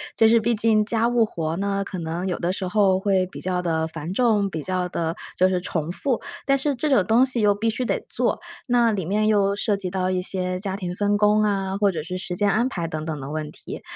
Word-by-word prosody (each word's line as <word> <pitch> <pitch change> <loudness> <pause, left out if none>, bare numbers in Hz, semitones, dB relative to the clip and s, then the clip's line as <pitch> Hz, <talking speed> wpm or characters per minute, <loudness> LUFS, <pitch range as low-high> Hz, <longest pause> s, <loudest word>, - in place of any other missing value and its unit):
就 225 - +5
是 230 +1 +5
毕 230 +1 +1
竟 215 0 +3
家 230 +1 +2
务 240 -2 +3
活 165 -5 -3
呢， 200 0 -1
可 195 -1 -6
能 170 +3 -3
有 180 - -1
的 180 +2 -1
时 190 -1 -3
候 190 -1 +3
会 190 -1 +2
比 - - -10
较 180 -1 -1
地 160 -2 0
繁 165 +2 -5
重， 215 -4 +2
比 160 -4 -4
较 185 -1 -1
地 165 -2 -2 0.2
就 185 +1 +4
是 185 -1 0
重 165 -3 -3
复。 250 +6 0 0.2
但 275 0 +3
是 280 +1 -1
这 300 +5 -1
种 255 -9 +4
东 235 +4 +4
西 255 -3 -1
又 205 -1 +4
必 225 +2 0
须 250 +3 -2
得 - - 0
做， - - -1 0.3
那 240 -2 +3
里 195 -5 -2
面 210 +4 +1
又 200 -2 +3
涉 205 0 0
及 195 -2 -4
到 185 0 -1
一 185 -1 0
些 185 0 -2
家 190 0 -3
庭 180 -3 -4
分 205 +1 +1
工 210 0 +4
啊， 195 -2 0
或 200 -1 +3
者 160 -4 -4
是 180 +3 -5
时 180 -1 -5
间 205 +1 +2
安 240 +4 +1
排 170 -8 -3
等 155 -1 -4
等 155 -2 -4
的 135 - -7
问 155 -1 -4
题， - - -9
195 Hz, 275 characters per minute, -23 LUFS, 180-215 Hz, 0.3 s, 就